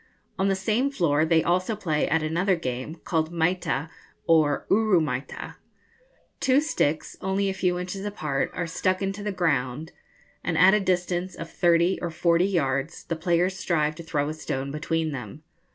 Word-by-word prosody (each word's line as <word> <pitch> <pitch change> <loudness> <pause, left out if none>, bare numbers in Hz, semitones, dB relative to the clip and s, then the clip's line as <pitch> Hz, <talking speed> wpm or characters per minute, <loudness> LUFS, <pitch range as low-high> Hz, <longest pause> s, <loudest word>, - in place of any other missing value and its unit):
On 190 - +2
the 195 - +2
same 220 +8 +1
floor 160 - +2
they 160 0 +3
also 185 +5 +1
play 160 -7 -1
at 160 +1 +2
another 175 +5 +1
game, 130 -1 -4
called 160 -1 0
maita, 165 -3 0 0.4
or 155 -3 +3
uru 210 -3 +4
maita. 135 -4 -4 0.8
Two 265 +1 +4
sticks, 160 - -1
only 195 +1 0
a - - -1
few 180 -2 0
inches 180 +2 -5
apart, 155 -9 -2
are 180 - -1
stuck 185 +3 -1
into 195 +1 -3
the 210 0 -2
ground, 155 -4 -1 0.5
and 165 -2 -1
at 185 +3 +7
a 210 - +4
distance 180 -1 -1
of 165 - -8
thirty 175 +1 +3
or 175 - -2
forty 170 +2 +2
yards 140 -4 -1
the 165 - -3
players 175 +3 +1
strive 155 -5 +1
to 155 - -9
throw 150 -3 -1
a 155 - -2
stone 140 -3 -4
between 160 +1 -1
them. 130 +2 -7
170 Hz, 170 wpm, -26 LUFS, 155-190 Hz, 0.8 s, at